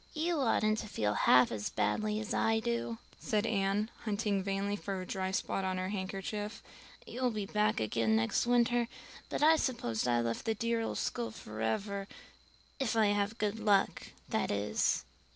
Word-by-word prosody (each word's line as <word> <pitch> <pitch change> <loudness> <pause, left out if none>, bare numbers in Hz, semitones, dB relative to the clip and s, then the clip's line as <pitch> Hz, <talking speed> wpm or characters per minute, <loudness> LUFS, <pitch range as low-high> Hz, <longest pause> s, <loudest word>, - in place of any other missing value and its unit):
"You 325 +1 0
oughtn't 220 -4 +2
to 215 - -5
feel 105 - 0
half 125 +4 +5
as 105 -2 -2
badly 215 0 0
as 220 - -4
I 225 0 +2
do," 235 0 -2 0.2
said 210 0 0
Anne, 205 0 0
hunting 205 -2 0
vainly 195 +1 -1
for 195 -2 -4
a 185 - -5
dry 190 0 -2
spot 190 0 -1
on 185 -1 -1
her 185 0 -2
handkerchief. 200 +2 -4 0.4
"You'll 250 0 -1
be 215 -3 -3
back 210 +1 +1
again 110 0 +1
next 110 - +1
winter, 240 0 +3 0.4
but - - -1
I 320 +1 +7
suppose 125 - -1
I've 120 -1 +2
left 115 0 -2
the 225 - +1
dear 230 +1 0
old 225 - -2
school 115 -1 -2
forever 115 - -3 0.7
if 260 -4 0
I 220 -2 +4
have 205 +2 0
good 210 +1 -1
luck, 205 -3 +2 0.2
that - - 0
is." 100 +1 +1
205 Hz, 170 wpm, -32 LUFS, 185-225 Hz, 0.7 s, I